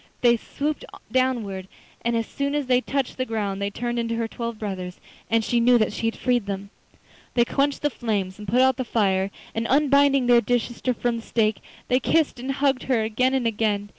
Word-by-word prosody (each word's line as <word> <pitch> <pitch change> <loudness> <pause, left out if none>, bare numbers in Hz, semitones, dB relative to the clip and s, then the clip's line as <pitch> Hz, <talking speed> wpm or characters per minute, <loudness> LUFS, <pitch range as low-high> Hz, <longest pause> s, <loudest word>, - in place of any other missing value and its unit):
They 240 -1 +5
swooped 290 +6 -3 0.3
downwards, 225 -8 0 0.4
and 235 0 +1
as 230 - -1
soon 280 +3 -2
as 295 -2 0
they 250 0 +3
touched 275 0 -2
the - - +2
ground 205 -4 -2
they 200 - 0
turned 240 +3 -3
into 230 0 -1
her 230 0 -1
twelve 235 0 -5
brothers, 185 -4 -5 0.3
and 225 0 +2
she 240 +2 +1
knew 245 +1 +5
that 215 -2 +1
she 225 - -1
had 225 - -2
freed 245 -4 +1
them. 200 0 -5 0.6
They 240 -1 +4
quenched 280 +3 0
the 295 - +2
flames 205 -5 -2
and 210 - -8
put 240 +7 +3
out 260 -1 +4
the 255 - -1
fire, 195 -5 +1 0.2
and, 225 +1 -2
unbinding 280 -1 +4
their 240 -1 +6
dear 245 +3 +2
sister 240 +2 -3
from 240 0 -1
the - - -6
stake, 220 -2 0 0.3
they 255 - +3
kissed 305 0 +1
and 265 +2 -2
hugged 275 -2 +1
her 235 -4 +3
again 255 +4 +1
and 260 -3 0
again. 210 -2 0
235 Hz, 215 wpm, -24 LUFS, 215-255 Hz, 0.6 s, their